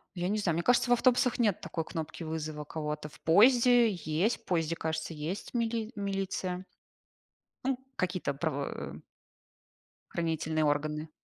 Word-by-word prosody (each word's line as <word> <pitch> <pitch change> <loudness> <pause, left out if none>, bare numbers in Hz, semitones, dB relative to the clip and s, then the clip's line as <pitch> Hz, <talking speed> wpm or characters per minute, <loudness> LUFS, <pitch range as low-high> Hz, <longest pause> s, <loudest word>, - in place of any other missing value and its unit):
Я 175 0 -1
не 205 - +1
знаю, 185 -6 +1
мне 170 - 0
кажется, 245 +3 +3
в - - +6
автобусах 250 0 +3
нет 215 -6 +2
такой 165 - -3
кнопки 160 0 -5
вызова 155 -1 -4
кого-то. 150 0 -4
В - - -17
поезде 240 +6 +6
есть, 175 +5 0
в - - -37
поезде, 165 -2 0
кажется, 160 0 -3
есть 160 +11 -5
мили 230 -2 -1
милиция 195 -2 -2 1.0
ну 265 -1 +1 0.2
какие-то 185 -5 -1
правоо 145 -1 -3 1.1
хранительные 160 -2 0
органы. 150 +1 0
170 Hz, 140 wpm, -30 LUFS, 155-215 Hz, 1.1 s, в